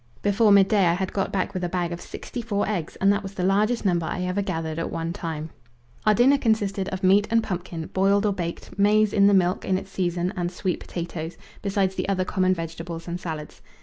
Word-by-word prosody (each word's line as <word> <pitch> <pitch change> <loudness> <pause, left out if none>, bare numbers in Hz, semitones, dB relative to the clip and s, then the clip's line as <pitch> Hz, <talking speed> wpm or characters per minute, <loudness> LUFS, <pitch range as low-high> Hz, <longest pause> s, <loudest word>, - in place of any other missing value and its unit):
Before 205 +1 +4
midday 200 -1 +5
I 170 - +3
had 190 +1 -3
got 195 - -1
back 190 -2 -1
with 185 - -3
a 175 - -1
bag 175 -1 -1
of 170 - -5
sixty 245 - -7
four 205 -3 -1
eggs; 180 -7 -3
and 195 +1 +3
that 205 - -1
was 195 -1 -8
the 180 - -2
largest 210 +5 +2
number 170 -4 +1
I 180 +2 -2
ever 180 +2 -1
gathered 160 -4 -3
at 165 - -2
one 165 0 -3
time. 160 -4 -5 0.6
Our 215 - +6
dinner 270 +5 +5
consisted 205 -5 0
of 190 +1 -5
meat 200 +3 +5
and 230 0 +3
pumpkin, 175 -4 -4
boiled 200 +2 +3
or 205 - +2
baked, 170 +2 -6
maize 210 +1 +4
"in 200 -1 +5
the 200 - +5
milk" 180 -1 +2
in 185 - +1
its 190 - -8
season 180 0 -1
and 175 -2 -2
sweet 185 -1 -2
potatoes, 170 -1 -6 0.2
besides 195 -1 0
the 190 - -3
other 185 -1 +1
common 185 -1 +1
vegetables 165 0 -6
and 175 +1 -3
salads. 155 -4 -6
185 Hz, 225 wpm, -25 LUFS, 175-200 Hz, 0.6 s, Our